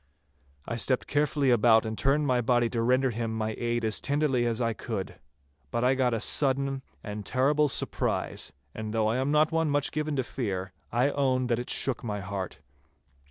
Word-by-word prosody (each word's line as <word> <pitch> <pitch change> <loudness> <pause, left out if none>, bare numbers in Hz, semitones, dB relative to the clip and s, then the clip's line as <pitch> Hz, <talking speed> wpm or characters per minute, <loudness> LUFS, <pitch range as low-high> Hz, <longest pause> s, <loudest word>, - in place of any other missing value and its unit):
I 115 - -3
stepped 130 +2 +1
carefully 145 -2 +1
about 115 -1 +5
and 110 0 -3
turned 140 +5 +2
my 125 -3 +2
body 120 -1 +2
to 115 - -1
render 130 +2 +2
him 115 0 -3
my 110 0 -1
aid 120 -1 -1
as 110 - +1
tenderly 140 -4 +1
as 115 0 -1
I 115 -2 0
could. 110 -3 -5 0.5
But 115 - -1
I 125 +1 +4
got 130 -2 +1
a - - -1
sudden 135 +1 +1 0.2
and 105 -1 -5
terrible 140 +7 +2
surprise, - - -1 0.2
and 110 0 -5
though 110 -1 +2
I 115 +3 +1
am 130 +2 0
not 150 +2 +3
one 165 -1 +1
much 145 -1 +1
given 155 0 -2
to 130 - 0
fear, 95 -8 -4 0.2
I 125 +4 +2
own 130 -3 +1
that 115 - 0
it 125 - -6
shook 135 -3 0
my 105 -3 -3
heart. 95 -2 -5
125 Hz, 195 wpm, -28 LUFS, 110-135 Hz, 0.5 s, about